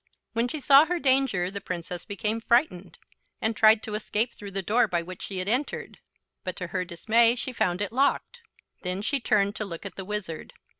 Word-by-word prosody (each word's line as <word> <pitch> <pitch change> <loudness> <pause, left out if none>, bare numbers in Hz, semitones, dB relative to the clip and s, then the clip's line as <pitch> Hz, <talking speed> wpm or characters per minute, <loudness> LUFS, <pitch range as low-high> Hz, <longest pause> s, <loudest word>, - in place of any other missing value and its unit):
When 230 +2 +1
she 310 +5 -4
saw 280 +2 +7
her 355 - 0
danger 260 - +2
the 200 0 -5
Princess 175 -1 -5
became 215 +2 -2
frightened, 215 - +1 0.4
and 220 0 -1
tried 220 0 +5
to 215 - -6
escape 215 +2 -1
through 205 - -9
the 195 0 -2
door 225 +7 +3
by 170 -1 -1
which 185 +1 -9
she 195 - -5
had 185 +1 -1
entered; 255 +7 -2 0.4
but 185 - -4
to 180 - -5
her 185 -1 0
dismay 225 +7 +3
she 250 +1 -4
found 180 -3 0
it 205 - -4
locked. 280 - 0 0.4
Then 185 +2 -3
she 280 +5 0
turned 205 -3 +1
to - - -2
look 175 -2 -7
at 200 - -7
the 190 - -4
Wizard. 195 -6 -5
210 Hz, 205 wpm, -26 LUFS, 185-235 Hz, 0.4 s, saw